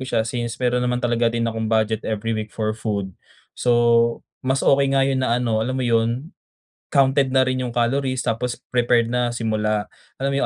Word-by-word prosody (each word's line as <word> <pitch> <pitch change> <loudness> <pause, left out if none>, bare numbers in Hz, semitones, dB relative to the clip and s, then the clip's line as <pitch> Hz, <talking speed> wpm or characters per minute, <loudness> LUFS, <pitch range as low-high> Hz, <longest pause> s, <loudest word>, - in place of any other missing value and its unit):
siya 115 -4 +1
since 120 -1 -3
mayro'n 125 -1 0
naman 125 0 0
talaga 120 -1 +1
din 115 0 -1
akong 115 -1 -2
budget 110 -1 +1
every 110 +1 -2
week 110 -1 -3
for 110 0 -2
food. 105 -4 -3 0.4
So, 120 -1 +2 0.2
mas 130 +1 0
okey 135 0 +3
nga 135 - +4
'yun 135 -1 0
na 120 -2 +1
ano, 115 -3 0
alam 130 +4 -2
mo 130 - -1
yun, 120 +5 0 0.6
counted 135 -1 +3
na 130 - +5
rin 130 0 0
yung 120 - -5
calories 130 +2 0
tapos 120 +1 -1 0.2
prepared 120 -1 +2
na 120 0 0
simula, 110 -2 -1 0.3
alam 135 - +1
mo 140 - -1
120 Hz, 190 wpm, -22 LUFS, 115-130 Hz, 0.6 s, na